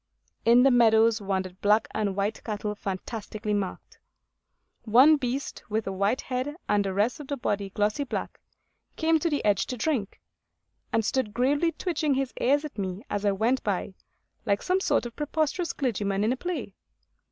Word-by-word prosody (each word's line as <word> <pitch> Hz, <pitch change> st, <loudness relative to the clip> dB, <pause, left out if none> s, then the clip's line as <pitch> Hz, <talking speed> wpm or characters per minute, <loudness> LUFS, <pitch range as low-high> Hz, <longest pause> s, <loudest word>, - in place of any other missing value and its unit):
In 240 Hz, +2 st, +6 dB
the 270 Hz, -, +6 dB
meadows 225 Hz, -2 st, +5 dB
wandered 190 Hz, -2 st, -3 dB
black 210 Hz, +2 st, +3 dB
and 205 Hz, -3 st, -1 dB
white 205 Hz, +2 st, -2 dB
cattle 210 Hz, -1 st, -3 dB
fantastically 210 Hz, +2 st, -4 dB
marked. 200 Hz, -2 st, -4 dB, 0.8 s
One 255 Hz, +8 st, +6 dB
beast, 265 Hz, 0 st, -3 dB
with 215 Hz, +1 st, -1 dB
a 195 Hz, -, -2 dB
white 200 Hz, +6 st, 0 dB
head 260 Hz, +3 st, -3 dB
and 205 Hz, -1 st, +2 dB
the 195 Hz, -, -2 dB
rest 220 Hz, +9 st, +1 dB
of 295 Hz, -, -8 dB
the 285 Hz, -, -3 dB
body 200 Hz, -5 st, -2 dB
glossy 210 Hz, +7 st, 0 dB
black, 275 Hz, -, -5 dB, 0.6 s
came 320 Hz, 0 st, +2 dB
to 335 Hz, -, 0 dB
the 290 Hz, -6 st, -1 dB
edge 205 Hz, -2 st, +2 dB
to 250 Hz, -, -4 dB
drink, 235 Hz, -6 st, -1 dB, 0.7 s
and 225 Hz, -1 st, +1 dB
stood 230 Hz, -5 st, -1 dB
gravely 285 Hz, +7 st, +2 dB
twitching 310 Hz, -4 st, 0 dB
his 270 Hz, -1 st, -1 dB
ears 285 Hz, +4 st, +3 dB
at 290 Hz, -8 st, -8 dB
me 190 Hz, +1 st, -4 dB
as 205 Hz, 0 st, -1 dB
I 200 Hz, -, +4 dB
went 230 Hz, +6 st, +1 dB
by, 195 Hz, -1 st, -2 dB, 0.5 s
like 200 Hz, -3 st, 0 dB
some 370 Hz, +1 st, +2 dB
sort 380 Hz, -, +1 dB
of 235 Hz, -, -7 dB
preposterous 310 Hz, +3 st, -1 dB
clergyman 205 Hz, -6 st, -1 dB
in 225 Hz, +4 st, +2 dB
a -, -, -5 dB
play. 305 Hz, -, -4 dB
225 Hz, 175 wpm, -27 LUFS, 205-275 Hz, 0.8 s, In